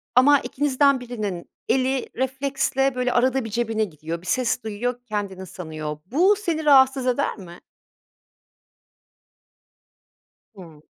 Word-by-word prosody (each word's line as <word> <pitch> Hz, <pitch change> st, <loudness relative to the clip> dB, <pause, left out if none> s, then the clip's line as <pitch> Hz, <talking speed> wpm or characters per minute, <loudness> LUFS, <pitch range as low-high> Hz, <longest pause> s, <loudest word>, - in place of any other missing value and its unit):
ama 280 Hz, +3 st, +6 dB
ikinizden 280 Hz, -1 st, +1 dB
birinin 215 Hz, -8 st, -5 dB, 0.2 s
eli 265 Hz, 0 st, +1 dB
refleksle 270 Hz, 0 st, 0 dB
böyle 250 Hz, 0 st, 0 dB
arada 255 Hz, 0 st, +2 dB
bir -, -, -5 dB
cebine 225 Hz, 0 st, -1 dB
gidiyor, 165 Hz, 0 st, -7 dB
bir 180 Hz, -, -13 dB
ses 250 Hz, 0 st, 0 dB
duyuyor, 235 Hz, +3 st, -3 dB
kendinin 200 Hz, -4 st, -4 dB
sanıyor. 155 Hz, -4 st, -6 dB
Bu 350 Hz, -, +3 dB
seni 335 Hz, -6 st, -3 dB
rahatsız 265 Hz, -2 st, +5 dB
eder 250 Hz, 0 st, 0 dB
mi? 175 Hz, -3 st, -11 dB, 3.0 s
Hıı. 165 Hz, -6 st, -13 dB
250 Hz, 115 wpm, -23 LUFS, 195-270 Hz, 3.0 s, ama